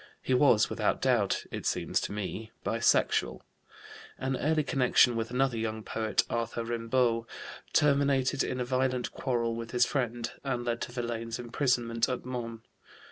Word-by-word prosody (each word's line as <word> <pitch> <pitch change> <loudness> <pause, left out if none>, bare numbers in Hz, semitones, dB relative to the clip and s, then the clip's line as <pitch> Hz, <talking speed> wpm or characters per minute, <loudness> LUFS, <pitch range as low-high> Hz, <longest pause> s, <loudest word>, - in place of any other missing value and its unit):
He 130 - 0
was 125 -5 +5
without - - 0
doubt, - - +1
it - - -5
seems - - 0
to - - -4
me, 105 +2 -5 0.2
bisexual. - - +2 0.8
An 130 0 -1
early 155 +3 +1
connection 125 -3 +4
with 115 0 -2
another 125 -1 0
young 110 -1 -3
poet, 110 0 0
Arthur 115 0 -2
Rimbaud, 115 0 0 0.4
terminated 140 -2 +3
in 125 - -3
a 125 - -1
violent 130 0 0
quarrel 120 -3 -1
with 115 0 -6
his 125 0 +3
friend, 120 -4 -2
and 125 -3 -2
led 120 -1 -1
to - - -4
Verlaine's 120 -2 -3
imprisonment 120 -1 0
at 125 -1 -3
Mons. 115 -3 -5
120 Hz, 150 wpm, -29 LUFS, 115-130 Hz, 0.8 s, was